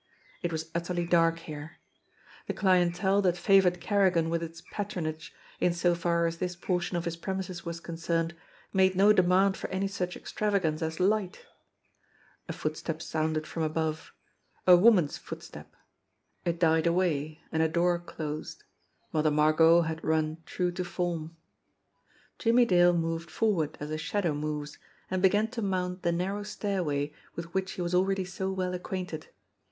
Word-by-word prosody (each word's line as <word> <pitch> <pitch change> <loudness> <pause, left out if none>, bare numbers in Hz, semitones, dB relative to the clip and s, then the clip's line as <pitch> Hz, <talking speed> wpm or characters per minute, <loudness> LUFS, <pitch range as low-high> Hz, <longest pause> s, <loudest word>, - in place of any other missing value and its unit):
It 175 - -2
was 160 0 -4
utterly 175 0 -1
dark 165 -1 +3
here. 155 0 -8 0.7
The - - -2
clien 185 -3 +3
tele 190 +3 +1
that 180 -2 +2
favored 180 -1 +4
Kerrigan 180 -5 +2
with 170 0 0
its 165 0 -7
patronage, 170 -6 -4 0.3
in 175 - +2
so 175 0 +2
far 170 0 +1
as 165 0 -1
this 180 -1 -2
portion 175 0 -1
of 170 - -3
his 170 -1 -2
premises 185 0 -4
was 170 0 -4
concerned, 165 0 -2 0.4
made 190 -1 +4
no 200 +3 +6
demand 190 +1 +3
for - - -5
any 190 +1 -1
such 180 -2 -3
extravagance 190 -7 -1
as 160 0 -3
light! 200 - 0 1.0
A - - 0
footstep 155 +1 -3
sounded 155 -1 -1
from 165 - -5
above, 155 0 -2 0.5
a 180 - +9
woman's 180 -5 +4
footstep; - - -10 0.7
it 170 -1 -1
died 160 -1 +3
away, 160 -3 0
and 160 - +1
a 160 - +4
door 175 +1 +2
closed. 155 -3 -6 0.5
Mother 155 0 +3
Margot 155 +3 +5
had 160 0 -3
run 155 0 0
true 180 -1 -1
to 180 +1 -3
form! 170 -2 -3 1.0
Jimmie 240 +1 +4
Dale 175 -4 +5
moved 165 0 -2
forward 180 -9 0
as 150 +1 -5
a 155 - -2
shadow 175 0 -1
moves, 150 0 -4 0.3
and 185 -1 0
began 205 +3 +3
to 235 0 -5
mount 185 -2 -1
the 170 - +1
narrow 190 +4 -1
stairway 175 -9 -2 0.2
with 170 0 -7
which 190 0 -1
he 180 - -3
was 175 +1 -3
already 190 +1 +2
so 190 +1 -3
well 185 -1 -2
acquainted. 180 -3 -5
175 Hz, 160 wpm, -29 LUFS, 160-185 Hz, 1.0 s, a